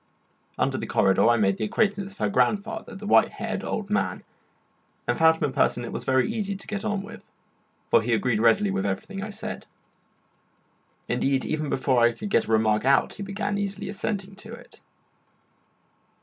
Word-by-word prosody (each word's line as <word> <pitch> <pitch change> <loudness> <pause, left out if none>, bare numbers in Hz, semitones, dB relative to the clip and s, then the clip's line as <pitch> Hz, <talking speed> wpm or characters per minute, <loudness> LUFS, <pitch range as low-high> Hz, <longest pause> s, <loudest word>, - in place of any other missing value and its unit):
Under - - 0
the - - -5
corridor 95 +3 +3
I 120 - +4
made 100 -3 +2
the - - -3
acquaintance 200 - 0
of - - -23
her - - 0
grandfather, 220 +2 0
the 205 +1 -8
white 220 +2 +5
haired 215 -2 -4
old 210 -3 -4
man, 210 - -1 0.8
and - - +2
found 160 -1 +5
him 150 -4 -1
a - - -13
person 120 - +1
it - - -6
was - - -5
very 130 0 +2
easy 210 -3 -2
to 195 - -7
get 210 -1 -4
on 210 -3 -1
with, 225 +1 -10 0.7
for 115 - +6
he 120 +2 -2
agreed 115 +1 0
readily 110 -3 +4
with 95 0 -1
everything 195 - -4
I 215 - -5
said. 205 - -7 1.4
Indeed, 135 -1 0
even 155 -1 -2
before 130 -1 +1
I 120 0 +4
could 205 - -7
get - - +3
a - - -5
remark 110 -1 +3
out 135 +2 +3
he - - -7
began 200 +1 -2
eagerly 200 -1 -3
assenting 200 -1 -3
to 215 +2 -10
it. 235 - -13
195 Hz, 190 wpm, -25 LUFS, -, 1.4 s, for